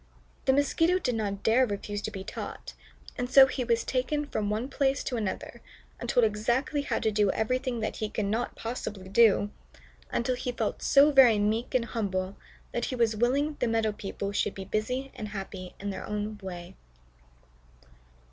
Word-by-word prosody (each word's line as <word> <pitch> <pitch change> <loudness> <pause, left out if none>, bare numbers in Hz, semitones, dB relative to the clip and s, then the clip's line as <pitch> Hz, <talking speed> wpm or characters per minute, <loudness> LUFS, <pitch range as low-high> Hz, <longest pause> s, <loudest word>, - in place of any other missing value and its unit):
The 265 - +4
Mosquito 325 +6 +3
did 265 -9 -1
not 200 -3 -3
dare 235 +4 +4
refuse 205 0 -4
to - - -3
be 195 -3 -7
taught, - - -7 0.5
and 245 0 -2
so 270 0 +9
he 255 -1 -2
was 230 -1 +1
taken 280 +4 -1
from 215 -7 -2
one 220 +4 -1
place 275 0 0
to 255 - -3
another, 210 -5 -4 0.4
and - - -5
told 245 - +4
exactly 240 +8 0
how 285 - -1
to 220 - +1
do 210 -1 +2
everything 250 +3 -1
that 215 - -3
he 215 - -2
could 215 -1 -2
not 225 +4 -1
possibly 210 -5 -5
do, 205 -1 +4 0.6
until 245 +2 0
he 250 0 -3
felt 225 -3 -2
so 285 +2 +6
very 260 -6 +7
meek 220 +5 0
and 245 -2 +2
humble 195 -4 -2 0.4
that 240 - -1
he 255 - -3
was 230 -3 +2
willing 275 +7 +1
the - - +1
meadow 225 -1 +1
people 200 -1 -5
should 205 0 -1
be 195 - -6
busy 250 +7 -2
and 215 - -6
happy 195 -2 -7
in 200 0 -3
their 190 - -6
own 210 0 -3
way. 180 -1 -8
225 Hz, 185 wpm, -28 LUFS, 205-255 Hz, 0.6 s, so